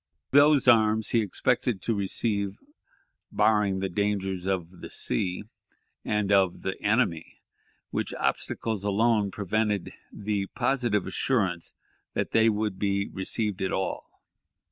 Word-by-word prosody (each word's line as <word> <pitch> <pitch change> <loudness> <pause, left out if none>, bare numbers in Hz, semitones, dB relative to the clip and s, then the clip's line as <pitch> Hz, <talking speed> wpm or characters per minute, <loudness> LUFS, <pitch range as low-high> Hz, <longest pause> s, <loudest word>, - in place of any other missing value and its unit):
Those 145 -1 +5
arms 110 -2 +4
he 115 - +3
expected 105 +1 0
to 115 - +1
receive, 100 0 -1 0.7
barring 105 -3 +2
the 95 - 0
dangers 95 -1 -2
of 90 -2 -3
the - - -8
sea, 90 +9 -2 0.6
and 105 -2 0
of 95 -3 +3
the 95 - -4
enemy, 105 -7 0 0.5
which - - -2
obstacles 110 -3 -1
alone 105 0 +2
prevented 105 0 -1 0.2
the 100 -1 -2
"positive 120 -8 +1
assurance 95 -10 -1 0.4
that - - -1
they 115 0 +4
would 105 -3 -2
be 100 0 0
received 105 +1 -2
at 95 - -1
all." 95 - -2
105 Hz, 120 wpm, -27 LUFS, 95-110 Hz, 0.7 s, Those